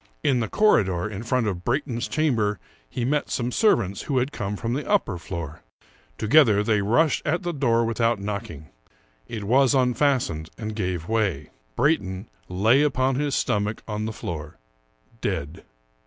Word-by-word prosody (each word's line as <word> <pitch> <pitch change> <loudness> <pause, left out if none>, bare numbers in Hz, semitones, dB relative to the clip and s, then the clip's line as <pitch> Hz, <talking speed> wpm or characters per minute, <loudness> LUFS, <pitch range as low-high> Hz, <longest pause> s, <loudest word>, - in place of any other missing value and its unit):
In 135 -5 +3
the 115 - -1
corridor, 100 - +2
in 105 -1 -6
front 120 +1 0
of 90 -4 -3
Brayton's 120 -1 -1
chamber, 115 -10 +1 0.3
he 120 - -3
met 145 +3 0
some 125 0 -1
servants 110 - +2
who 140 - -2
had 130 +3 +1
come 105 -6 -3
from 115 +3 -3
the 145 +3 -3
upper 150 - +1
floor. 80 -3 -6 0.6
Together 110 -4 +4
they 105 -1 +2
rushed 120 +10 +2
at 175 +5 -1
the 175 0 -2
door 120 -5 +2
without 115 -1 +1
knocking. 100 -8 -6 0.6
It 110 -3 -5
was 130 +5 +3
unfastened, 125 - +1
and 110 -1 -5
gave 90 -5 -3
way. 105 -10 -1 0.2
Brayton 100 - 0 0.2
lay 110 +9 +3
upon 135 -2 +2
his 145 +1 0
stom 105 0 +1
ach 110 - -6
on 105 -1 -3
the 110 - -3
floor, 75 -7 -6 0.6
dead. 80 -4 -3
115 Hz, 160 wpm, -24 LUFS, 100-130 Hz, 0.6 s, Together